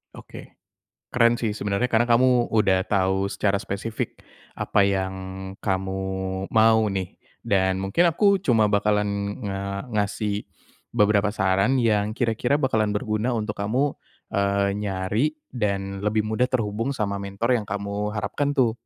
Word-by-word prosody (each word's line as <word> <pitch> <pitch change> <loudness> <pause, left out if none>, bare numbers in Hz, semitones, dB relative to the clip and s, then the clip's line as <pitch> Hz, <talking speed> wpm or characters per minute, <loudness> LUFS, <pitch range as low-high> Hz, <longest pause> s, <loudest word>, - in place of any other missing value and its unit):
Oke. - - -12 0.6
Keren 120 -1 +4
sih 115 -3 -1
sebenarnya 105 +4 -1
karena 120 +2 +3
kamu 120 0 +4
udah 95 -3 +2
tahu 95 0 +1
secara 100 0 0
spesifik 105 +4 -4 0.4
apa - - +1
yang 95 -1 +1 0.5
kamu 95 0 -2 0.5
mau 110 0 +5
nih. 95 -2 -4 0.2
Dan 95 -1 +1
mungkin 170 - +3
aku 200 +3 +3
cuma 115 - +3
bakalan 105 0 +2 0.4
nga 100 0 -4
ngasih 105 0 -1 0.5
beberapa 105 -2 +3
saran 100 +5 +2
yang 110 -3 +1
kira-kira 120 +3 +1
bakalan 110 -7 +1
berguna 110 +4 -1
untuk 105 -1 -3
kamu, 130 +8 +1 0.4
eee, 100 0 +1
nyari 100 +4 0 0.3
dan 100 -4 -2
lebih 105 +1 0
mudah 110 +4 0
terhubung 115 +2 -1
sama 100 -2 -2
mentor 100 +5 -1
yang 105 - -9
kamu 100 +1 -3
harapkan 145 +6 -1
tuh. 120 -4 +3
105 Hz, 135 wpm, -24 LUFS, 100-115 Hz, 0.6 s, mau